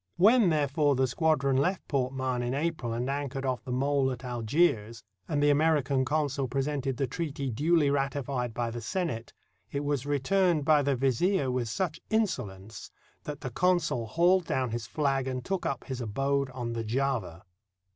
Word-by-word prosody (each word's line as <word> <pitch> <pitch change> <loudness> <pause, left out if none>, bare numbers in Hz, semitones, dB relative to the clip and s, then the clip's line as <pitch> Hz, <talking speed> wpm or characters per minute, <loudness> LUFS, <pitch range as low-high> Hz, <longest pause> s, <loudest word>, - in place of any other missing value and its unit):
When, 215 +1 +6
therefore, 145 -1 +2
the 130 +1 +2
squadron 140 0 +1
left 180 +7 0
Port 130 -3 0
Mahon 130 -2 -2
in 120 +2 -1
April 150 -5 -2
and 120 +2 -2
anchored 140 -1 -3
off 130 -2 -1
the 125 - -6
mole 135 +1 +1
at 125 +1 -7
Algiers, 115 -2 0 0.2
and 145 -2 0
the 145 - +5
American 145 -3 +2
consul 145 -2 0
presented 135 0 -2
the 135 - +1
treaty 140 -1 -3
duly 150 +4 +2
ratified 135 -3 -1
by 115 +1 -2
the 120 0 -5
Senate, 115 - -3 0.4
it 140 0 -2
was 145 -2 -1
returned 155 +3 +2
by 155 -1 +5
the 140 -1 +1
Vizier 135 - +1
with 125 -2 -1
such 160 - -2
inso 215 - +1
lence 95 +3 -11 0.4
that 145 -1 -6
the 130 -4 -5
consul 170 -7 +1
hauled 175 +6 +3
down 130 -3 0
his 115 -1 -4
flag 135 -3 0
and 130 -1 -3
took 195 -2 -1
up 140 - -3
his 130 -2 -5
abode 135 +5 0
on 120 -2 -4
the 115 -1 -3
Java. 115 -7 -2
135 Hz, 175 wpm, -29 LUFS, 125-150 Hz, 0.4 s, When